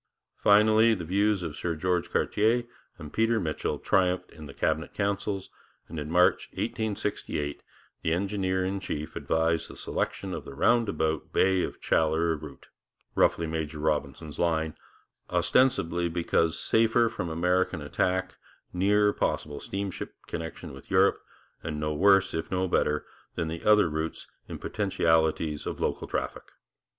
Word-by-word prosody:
Finally, 110 +2 +5
the 85 -4 -6
views 100 +2 +1
of 80 -3 -4
Sir 85 0 -2
George 90 +2 0
Cartier 115 +4 +2 0.3
and 75 0 -10
Peter 115 0 +2
Mitchell 80 -5 -2
triumphed 90 -1 +1
in 80 -2 -10
the 70 - -10
Cabinet 80 +1 -1
councils, 100 -1 -2 0.4
and 80 - -6
in 75 +1 -5
March 90 +2 +3
1868 100 -9 -3 0.4
the 80 - -1
engineer 95 0 0
in 95 +1 -2
chief 75 -5 -5
advised 80 +1 0
the - - -10
selection - - -3
of - - -5
the 70 - -10
roundabout 100 -6 +1
Bay 95 -1 +3
of - - -4
Chaleurs 80 0 +1
route 75 -3 -11 0.4
roughly 85 - +3
'Major 80 -1 -3
Robinson's 75 0 -2
line' 80 -2 0 0.5
ostensibly 90 -10 +2
because 85 -1 +1
safer 115 +1 +3
from 90 -6 -4
American 90 +1 +1
attack, 90 +5 -1 0.3
nearer 105 +3 +3
possible 75 -1 -2
steamship 100 -1 -5
connection 80 -4 -6
with 65 - -13
Europe, 95 +1 +3 0.4
and 75 -2 -4
no 75 0 -1
worse, 95 +3 +4
if 80 - -3
no 95 0 0
better, 75 -4 +1 0.3
than 85 -3 -2
the 80 +1 -6
other 105 -3 +5
routes 80 +1 -3 0.2
in - - -6
potentialities 80 -6 0
of - - -4
local - - -2
traffic. - - -4
85 Hz, 140 wpm, -28 LUFS, 80-100 Hz, 0.5 s, Finally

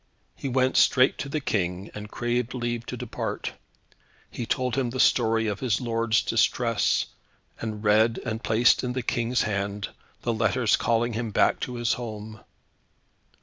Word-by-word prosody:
He 135 - -4
went 130 0 +2
straight 130 0 +4
to 140 - -4
the 155 - -1
King, 95 -6 -2
and 105 0 -7
craved 120 +2 -2
leave 120 -1 -3
to - - -5
depart. - - -4 0.8
He 120 - -5
told 125 -1 0
him 130 -3 0
the 130 +2 -5
story 115 -3 +3
of 105 -2 -2
his 120 -5 0
lord's 115 -2 +1
distress, - - +2 0.5
and 110 -1 -5
read, 110 +2 +4
and 110 0 -3
placed 115 +3 +4
in 125 -1 -2
the 130 -1 -2
King's 120 -1 0
hands, 100 -1 -2 0.3
the 120 - 0
letters 115 +1 +2
calling 120 0 +1
him 115 +1 -2
back 105 - +2
to 125 - -4
his 120 -2 +1
home. 110 -2 -6
115 Hz, 160 wpm, -26 LUFS, 110-125 Hz, 0.8 s, straight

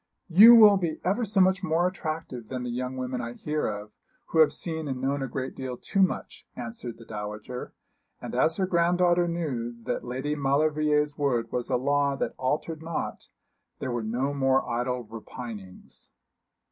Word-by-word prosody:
'You 215 +8 +10
will 210 -3 +8
be 170 -4 -2
ever 200 +7 +1
so 210 -2 0
much 190 0 +3
more 170 -1 +1
attractive 155 - -5
than 125 +1 -4
the 125 - -3
young 125 +2 -3
women 130 0 -3
I 120 0 -5
hear 150 +4 -2
of, 105 0 -5 0.4
who 160 - +1
have 155 - +6
seen 160 -2 -4
and 130 -2 -3
known 135 +2 -1
a 135 - -2
great 130 +1 -4
deal 130 -2 -5
too 195 - -1
much,' 190 - -1
answered 120 -1 -6
the 115 - -13
dowager; 105 +3 -6 0.4
and - - -7
as 160 - +2
her 190 - +1
granddaughter 175 0 +3
knew 135 -9 -3
that - - -2
Lady 130 +4 -3
Maulevrier's 150 +1 +1
word 120 -5 0
was 120 -1 -3
a 125 - +2
law 140 +2 +1
that - - -2
altered 150 +4 -2
not, 165 0 -4 0.5
there 130 - -4
were 120 -1 -1
no 125 +6 -1
more 135 -1 +2
idle 125 +1 -1
repinings. 110 -3 -9
135 Hz, 175 wpm, -27 LUFS, 125-160 Hz, 0.5 s, You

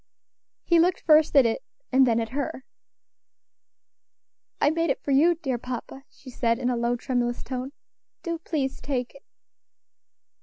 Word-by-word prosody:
He 340 -2 +3
looked 355 +2 +2
first 310 -1 +4
at 275 -3 +7
it, 230 - 0 0.3
and 265 0 +5
then 230 -1 +2
at 225 -1 -3
her. 265 0 -4 1.9
"I 290 - +3
made 330 0 0
it 270 - -1
for 280 - -2
you, 320 +6 +4
dear 270 -7 -3
papa," 255 +2 -7
she 260 - -14
said, 230 -1 0
in 250 0 -1
a - - 0
low, 235 +1 0
tremulous 240 -1 -2
tone; 255 +1 -5 0.5
"do 335 -2 -3
please 290 -5 -3
take 250 -4 -3
it." 275 - -16
265 Hz, 155 wpm, -25 LUFS, 245-305 Hz, 1.9 s, at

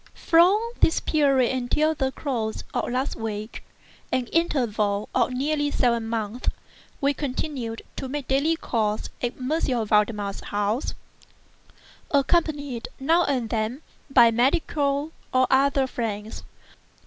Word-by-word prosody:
From 350 +5 +5 0.2
this 320 - +4
period 275 -5 +2
until 300 +5 +1
the 265 -3 -1
close 235 -7 -3
of - - -1
last 255 +3 -1
week—an 220 +3 -6
interval 215 -11 +1
of 250 0 +2
nearly 290 +3 0
seven 235 -5 +1
months—we 230 +5 -3
continued 260 -4 -4
to 265 - -4
make 285 -1 -4
daily 280 +5 +2
calls 215 -8 -2
at 245 0 -2
M. 255 -3 0
Valdemar's 210 -1 +1
house, 205 +5 -1 1.1
accompanied, 285 -4 +1
now 330 +6 +3
and 250 -5 -1
then, 230 +6 -2 0.3
by 240 -4 +6
medical 280 +3 +1 0.2
and 255 0 +5
other 270 0 +4
friends. 220 -4 -4
255 Hz, 115 wpm, -25 LUFS, 225-285 Hz, 1.1 s, by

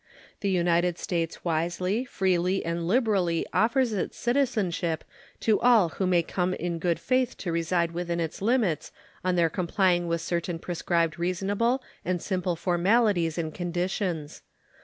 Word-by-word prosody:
The 200 - -1
United 175 -1 +2
States 165 -1 -3
wisely, 175 +7 0
freely, 185 -4 0
and 170 0 -2
liberally 195 -7 +2
offers 230 +5 +2
its 195 - -3
citizenship 215 - 0 0.4
to 220 -2 +3
all 230 -8 +5
who 190 +3 -2
may 175 -2 +3
come 180 +2 -1
in 170 0 -3
good 170 0 0
faith 255 0 0
to 175 - -3
reside 170 0 0
within 170 0 -2
its 165 +1 -3
limits 205 - +1 0.3
on 185 0 +1
their 170 -2 +4
complying 175 +1 +1
with 170 0 -1
certain 170 0 -2
prescribed 170 -1 -1
reasonable 200 +8 0 0.2
and 180 0 -1
simple 180 -1 -1
formalities 180 0 +2
and 160 -2 -2
conditions. 175 -2 -3
180 Hz, 140 wpm, -27 LUFS, 170-200 Hz, 0.4 s, all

